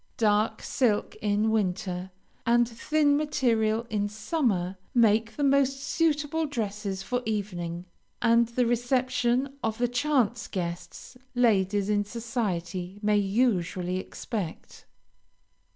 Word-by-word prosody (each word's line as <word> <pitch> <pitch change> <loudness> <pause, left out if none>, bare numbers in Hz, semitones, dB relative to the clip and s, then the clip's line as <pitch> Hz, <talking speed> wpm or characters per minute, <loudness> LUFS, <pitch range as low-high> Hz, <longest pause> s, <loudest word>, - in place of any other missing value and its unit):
Dark 215 -2 +2
silk 230 -6 0
in 210 +1 +1
winter, 185 -3 -1 0.3
and 240 0 +3
thin 290 +5 +1
material 235 -7 +1
in 205 -1 0
summer, 215 - -1 0.2
make 225 -1 +3
the 290 - -2
most 275 -1 +3
suitable 310 +1 0
dresses 205 -6 -3
for 245 +4 -1
evening, 180 -6 -3 0.3
and 235 0 +4
the 240 +1 0
reception 250 +2 0
of 220 -1 -1
the 245 - +1
chance 245 -3 +1
guests 175 +5 -6 0.2
ladies 205 -4 +2
in 205 -1 +2
society 200 -5 -3
may 210 0 +3
usually 195 -4 +1
expect. 190 -2 -6
220 Hz, 110 wpm, -27 LUFS, 200-250 Hz, 0.3 s, and